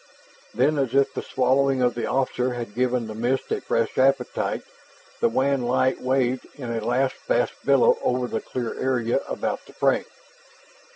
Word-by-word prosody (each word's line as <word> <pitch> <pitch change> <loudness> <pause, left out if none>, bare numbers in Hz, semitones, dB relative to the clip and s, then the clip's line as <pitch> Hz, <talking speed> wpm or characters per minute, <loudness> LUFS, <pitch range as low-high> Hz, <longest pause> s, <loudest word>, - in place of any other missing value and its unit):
Then, 140 +5 +2
as 135 -2 -1
if 140 0 +3
the - - -3
swallowing 130 0 +2
of 125 -1 +2
the 120 - -3
officer 130 -1 0
had 115 -4 -6
given 125 0 0
the 110 - -6
mist 120 +4 -1
a 440 -2 0
fresh 485 0 -1
appetite, - - +1 0.6
the 235 - +3
wan 135 - +1
light 130 +2 +1
waved 130 -1 0
in 125 -5 -5
a 115 - -3
last 130 0 +1
vast - - +1
billow 480 0 +4
over 125 0 0
the 115 - -3
clear 120 -3 -4
area 125 -3 +1
about - - -3
the - - -15
frame. - - +1
130 Hz, 170 wpm, -24 LUFS, 120-135 Hz, 0.6 s, billow